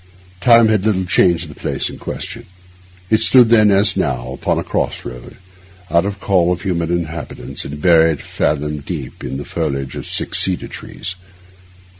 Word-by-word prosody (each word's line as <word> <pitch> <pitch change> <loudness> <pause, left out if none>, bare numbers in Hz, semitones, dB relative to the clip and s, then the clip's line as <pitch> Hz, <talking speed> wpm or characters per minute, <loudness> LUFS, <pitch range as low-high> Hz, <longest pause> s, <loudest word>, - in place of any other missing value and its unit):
Time 115 +2 +6
has 105 -3 +2
little 100 -4 +1
changed 85 -2 +2
the 75 - -10
place - - -2
in - - -8
question. 115 0 -6 0.6
It 110 - +4
stood 125 -3 +6
then, 110 -2 +5
as 100 +1 +3
now, 60 -2 -2
upon - - -1
a - - -1
cross - - -2
road, 60 -1 -9 0.6
out 85 +4 +3
of 100 0 -5
call 90 -3 +2
of 90 - -3
human 85 -2 -1
habitations, 85 +2 -6
and 75 +2 -7
buried 80 -2 +4
fathom 75 0 -2
deep 70 -3 -7
in 65 - -4
the 70 - -6
foliage 70 -1 -3
of - - -6
six - - +1
cedar 95 -2 0
trees. 90 - -6
85 Hz, 170 wpm, -18 LUFS, 75-100 Hz, 0.6 s, Time